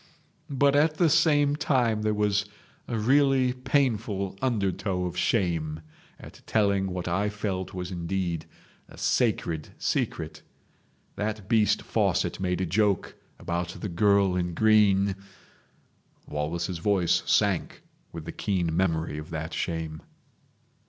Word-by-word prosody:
But 140 0 +3
at 155 +2 +3
the 165 -2 +3
same 145 -2 +4
time 125 -8 +1
there 110 0 +1
was 105 0 +1 0.4
a 115 - -2
really 130 +2 +3
painful 115 -7 0
undertow 100 -6 -1
of 90 -1 -4
shame 85 -5 0 0.4
at - - -13
telling 100 -3 +2
what 90 -1 -4
I 95 +4 0
felt 100 -3 -4
was 90 0 -5
indeed 85 -2 -3 0.4
a - - -14
sacred 80 -3 0
secret. - - -2 0.8
That 105 -2 -3
beast 110 -2 +2
Fawcett - - 0
made 90 -1 -1
a - - +1
joke 100 +2 +1 0.2
about 85 0 -3
the 105 - -4
girl 100 +1 +3
in 90 -2 -2
green—." 100 -2 +4 1.1
Wallace's 85 +4 -3
voice 95 -1 +2
sank - - +1 0.3
with 80 -2 -8
the - - -5
keen 90 -6 -1
memory 80 -4 0
of 75 - -9
that 80 +1 -5
shame. 80 -2 -3
95 Hz, 125 wpm, -27 LUFS, 85-110 Hz, 1.1 s, same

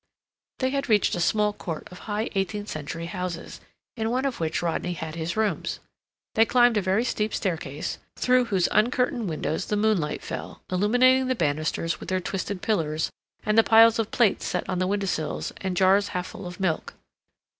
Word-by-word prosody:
They 260 0 0
had 275 -1 -2
reached 210 -2 +3
a 175 - -1
small 210 +4 +2
court 165 -6 -6
of 180 - -10
high 210 +2 -1
eighteenth 205 +2 -2
century 155 +2 -5
houses, 180 -1 -5 0.3
in 225 -1 -1
one 255 +3 0
of 270 -3 -2
which 160 +1 -1
Rodney 175 +1 -1
had 160 -2 -6
his 165 +3 -3
rooms. 220 -1 -1 0.5
They 225 - +5
climbed 245 0 +4
a 210 - +2
very 190 +4 +1
steep 215 -3 -1
staircase, 160 -6 -3 0.2
through 250 0 +3
whose 195 -6 +1
uncurtained 240 -1 +1
windows 155 0 -2
the 210 - 0
moonlight 205 -8 +1
fell, - - -7
illuminating 245 +7 +4
the 255 - +1
banisters 155 -1 -1
with - - -8
their 185 0 +1
twisted 190 +1 -4
pillars, 160 -7 0 0.3
and 215 +1 +4
the - - +7
piles 225 +1 +6
of 225 -1 0
plates 230 -5 +2
set 180 - -2
on 185 -1 -1
the 185 - +1
window 200 +1 0
sills, 160 -5 -2
and 190 -2 -3
jars 195 +2 +4
half 180 -2 -3
full 185 - -8
of 175 -1 -9
milk. 175 -5 -1
195 Hz, 190 wpm, -26 LUFS, 170-225 Hz, 0.5 s, the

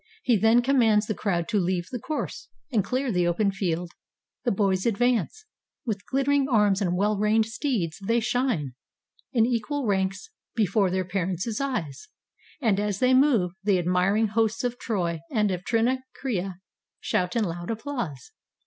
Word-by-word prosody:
He 245 - +3
then 225 +3 +4
commands 230 -5 +3
the 215 - -1
crowd 175 -5 -1
to 215 - +2
leave 180 -1 -1
the 250 - -3
course, 310 - -5 0.2
And 220 -5 +2
clear 255 +3 -1
the 180 -3 +1
open 200 +4 +1
field. 175 -3 -2 0.5
The 240 - +2
boys 190 0 +1
advance; 245 - 0 0.4
With 205 -5 -3
glittering 275 +1 +1
arms 210 -4 +3
and 180 -2 0
well 205 +1 +1
reined 215 +1 +3
steeds 225 - -2
they 230 +4 +2
shine 230 - -1 0.6
In 230 -4 +3
equal 245 +4 -1
ranks 190 -2 -1 0.2
before 205 -2 +2
their 185 0 -1
parents' 190 +5 -2
eyes; 250 - -3 0.5
And 220 -8 +2
as 205 -2 -1
they 255 +4 +3
move, 255 -10 +4
the 200 -2 +3
admiring 180 +5 +2
hosts 225 +2 0
of 245 0 -2
Troy 175 -7 -1
And 210 -4 +1
of 180 -1 -3
Trinacria 235 -5 -1 0.4
shout 180 +3 -1
in 230 - +2
loud 175 -2 -4
applause. 225 - -4
210 Hz, 155 wpm, -26 LUFS, 185-245 Hz, 0.6 s, then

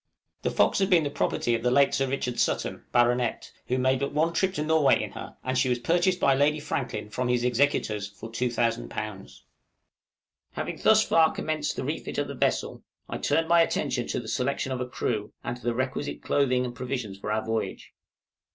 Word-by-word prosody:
The - - 0
'Fox' - - +2
had 195 0 +2
been 175 -5 +5
the 145 - -2
property 120 - 0
of 115 - 0
the 125 - +2
late 140 +2 +4
Sir 135 - +1
Richard 125 -2 -2
Sutton, - - -1
Bart., 120 0 +1 0.2
who 130 - 0
made 130 0 +2
but 140 - -2
one 160 +3 +1
trip 190 +3 +1
to 150 - -1
Norway 155 -2 +4
in - - -4
her, - - -9
and 130 0 -1
she 130 0 +2
was 125 - +2
purchased 175 +8 +1
by 140 - +4
Lady 145 +3 +2
Franklin 135 -7 -4
from 125 +3 -1
his 125 -1 +1
executors 125 -5 +1
for 100 +3 -11
2000_l._ 110 - -2 1.1
Having - - -4
thus - - +6
far 160 -1 +4
commenced 155 -1 -2
the - - -3
refit - - -4
of - - 0
the - - -5
vessel, - - -1 0.3
I - - -5
turned 160 +3 +1
my 170 0 +5
attention 130 -6 0
to - - -2
the 115 - -8
selection 135 +2 -1
of 130 -1 -2
a 125 - -2
crew 110 -3 -2
and 120 - -3
to - - -17
the 120 -1 -1
requisite 130 +3 -3
clothing 130 -3 +2
and 120 - -5
provisions 125 -5 -4
for 105 - -4
our 110 0 -1
voyage. 110 0 -3
125 Hz, 205 wpm, -27 LUFS, 120-145 Hz, 1.1 s, thus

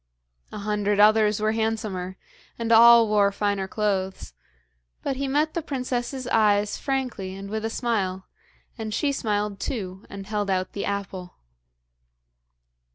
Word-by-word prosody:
A - - -7
hundred 205 0 -1
others 215 0 +5
were 215 +1 +1
handsomer, 215 -5 -2 0.4
and 230 -1 -2
all 235 0 +8
wore 205 -1 +3
finer 200 -1 -1
clothes; 190 - -2 0.7
but 270 -2 -2
he 275 0 -2
met 300 +3 +1
the 335 - -2
princess's 255 -2 -3
eyes 210 -4 +2
frankly 250 -9 -3
and 195 +1 -8
with 220 0 -3
a 225 - -1
smile, 195 -6 -2 0.5
and 220 -1 -3
she 290 - +1
smiled 210 -6 -2
too, 190 -6 -4
and 195 -1 -8
held 210 -1 -2
out 185 -1 -1
the 200 - -3
apple. 195 -3 -5
210 Hz, 140 wpm, -25 LUFS, 200-230 Hz, 0.7 s, all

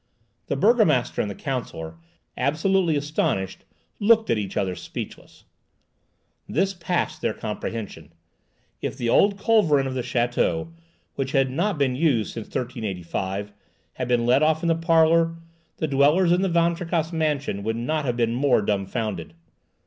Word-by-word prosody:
The - - -1
burgomaster 170 - +3
and 105 - -2
the 100 - -6
counsellor, 80 - -5 0.4
absolutely 165 +5 +1
astounded, 140 -10 -1 0.4
looked 225 +1 +4
at 115 - +2
each 100 -2 -5
other 95 -3 0
speechless. - - -8 1.1
This 190 +5 +1
passed 175 -3 -2
their 110 - -1
comprehension. 105 -7 -6 0.7
If - - -4
the 120 - -1
old 200 - +4
culverin 195 -11 +3
of 135 - -3
the 130 - -2
château, 125 +7 0 0.4
which 135 -1 -3
had 135 -2 +2
not 175 +6 0
been 135 -3 +1
used 130 -7 +1
since 115 -2 -6
1385, 100 -4 -4 0.4
had 125 - -4
been 120 -1 +2
let 125 +4 +4
off 155 +1 +2
in 170 - +1
the 165 - +3
parlour, 165 0 +3 0.4
the 160 - -1
dwellers 150 +6 +4
in 180 +1 +3
the 190 - +1
Van 170 0 +3
Tricasse 165 -1 -2
mansion 150 -9 -1
would 110 +2 -2
not 150 +7 -1
have 125 -3 -1
been 115 -1 +1
more 125 -3 +2
dumbfoundered. 100 -4 -2
135 Hz, 150 wpm, -24 LUFS, 115-165 Hz, 1.1 s, looked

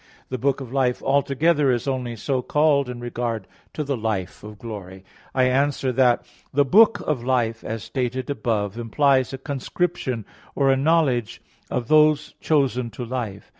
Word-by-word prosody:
The 130 - -3
book 135 +2 0
of 130 -1 -8
life 130 -2 +1
altogether 140 +2 +2
is 125 +1 0
only 125 -3 -2
so 130 +4 -1
called 145 -1 +2
in 125 -1 -6
regard 120 -3 -3 0.3
to 155 - -2
the 140 -1 -1
life 110 -6 -3
of 105 0 -10
glory. 95 -4 -8 0.3
I 130 - +3
answer 135 +1 +1
that, 125 -1 +3 0.3
The 145 +1 +3
book 220 - +5
of 140 -6 -2
life, 120 -3 0
as 110 -1 -5
stated 130 -1 -3
above 110 -8 -1
(A. - - -5
1), 120 - -4
implies 135 +2 +3
a 135 - -5
conscription 135 - -3 0.3
or 135 -1 +3
a - - +4
knowledge 135 -5 +1 0.3
of 120 -2 -2
those 150 0 +4
chosen 130 -5 +1
to 120 +2 -7
life. 115 -5 -5
130 Hz, 170 wpm, -23 LUFS, 115-140 Hz, 0.3 s, book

